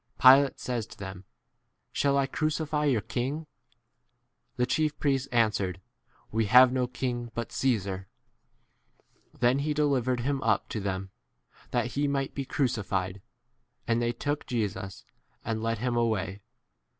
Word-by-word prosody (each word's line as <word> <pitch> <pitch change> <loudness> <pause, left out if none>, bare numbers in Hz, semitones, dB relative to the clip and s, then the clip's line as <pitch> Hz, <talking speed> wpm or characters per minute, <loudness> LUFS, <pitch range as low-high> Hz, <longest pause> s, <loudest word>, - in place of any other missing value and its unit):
Pilate 135 +2 +7
says 120 -3 -3
to 110 - -13
them, 95 -1 -8 0.7
Shall 140 -1 +2
I 140 - +3
crncify 150 0 0
your 115 -5 +2
king? 140 +6 -3 1.1
The 125 - +1
chief 155 +3 0
priests 135 -2 +1
answered, 105 -7 +1 0.5
We 110 +1 +1
16 125 +5 +8
have 130 -1 +7
no 125 -1 +1
king 120 -1 -3
but 120 -1 -4
Caesar. 100 -7 -1 1.3
Then 125 +3 +4
he 150 +1 -1
delivered 130 -4 +1
him 135 +2 -1
up 110 -3 +1
to 110 - -3
them, 95 -1 -3 0.6
that - - 0
he 145 +1 +1
might 140 -1 -1
be 140 - -3
crucified; 100 -9 -1 0.7
and 115 0 +2
they 120 0 +1
took 145 +4 -3
Jesus 95 -5 -3 0.4
and 110 -1 -2
led 115 0 0
him 120 +2 -1
away. 105 -4 0
120 Hz, 140 wpm, -28 LUFS, 105-135 Hz, 1.3 s, 16